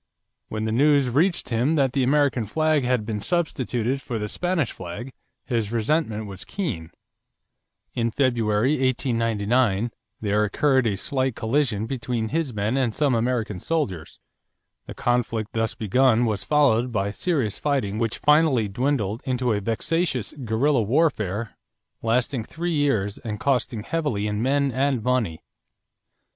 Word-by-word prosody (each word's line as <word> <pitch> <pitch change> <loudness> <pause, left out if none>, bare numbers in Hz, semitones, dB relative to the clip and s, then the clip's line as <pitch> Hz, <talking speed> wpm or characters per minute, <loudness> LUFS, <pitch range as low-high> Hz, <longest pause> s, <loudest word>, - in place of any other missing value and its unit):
When 110 0 -3
the 110 - -1
news 140 +1 +3
reached 170 +6 +1
him 125 +7 +1
that 135 -4 +2
the 135 - +1
American 135 -3 +2
flag 155 +3 +1
had 125 -3 +1
been 105 -2 -3
substituted 135 - -1
for 120 -3 -4
the 105 -1 -3
Spanish 175 - -1
flag, 95 +9 -7 0.3
his 115 -5 -1
resentment 115 -1 0
was 100 -1 -8
keen. 115 - -4 1.0
In 115 -1 0
February, 115 -1 +1
1899, 115 -3 +1 0.3
there 105 0 +1
occurred 130 +3 +2
a 100 - 0
slight 130 +2 -1
collision 110 -3 0
between 120 -2 -3
his 160 -1 -1
men 105 +3 -1
and 125 -5 0
some 145 -4 +2
American 115 -4 0
soldiers. 100 - -3 0.7
The - - -8
conflict 115 -3 -1
thus 115 0 -1
begun 120 +2 +3
was 105 -4 -1
followed 125 -2 +3
by 100 -2 -1
serious 135 - -1
fighting 130 -8 -1
which 115 -2 -1
finally 150 -7 +3
dwindled 115 -1 -1
into 125 -2 0
a 105 - -1
vexatious 130 - -1
guerrilla 120 +4 +2
warfare 115 - 0 0.5
lasting 120 +2 0
three 170 +5 -3
years 125 -10 0
and 105 -2 -5
costing 125 -5 0
heavily 145 -9 -1
in 105 0 -1
men 140 +2 +2
and 130 -2 0
money. 120 -10 0
120 Hz, 140 wpm, -24 LUFS, 110-140 Hz, 1.0 s, news